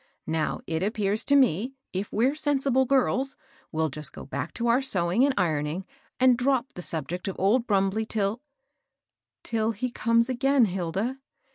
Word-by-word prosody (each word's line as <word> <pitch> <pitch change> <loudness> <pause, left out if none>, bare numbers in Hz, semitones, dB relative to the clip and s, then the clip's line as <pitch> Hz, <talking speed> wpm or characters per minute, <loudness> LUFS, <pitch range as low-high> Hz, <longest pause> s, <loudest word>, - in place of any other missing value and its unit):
Now, 160 0 -1
it 160 0 -2
appears 210 +1 0
to 285 - +4
me, 255 - +2 0.2
if 190 +2 -3
we're 245 +6 +2
sensible 275 -3 +2
girls, 265 0 +1 0.4
we'll 160 0 0
just 150 +1 -7
go - - -10
back 140 +4 -4
to 235 - -2
our 240 +3 +3
sewing 190 -3 +1
and 280 - +4
ironing, 155 0 0
• - - -36 0.3
and 255 -2 +5
drop 260 0 +1
the 180 - -7
subject 170 +3 -2
of 195 - -3
old 230 +6 +2
Brumbley 200 +2 +1
till 215 +2 -1 0.2
" - - -53
— - - -60
" - - -65
Till 225 0 0
he 245 +4 -3
comes 230 0 +2
again, 265 0 +3
Hilda 195 +7 -2
220 Hz, 180 wpm, -26 LUFS, 180-255 Hz, 0.4 s, and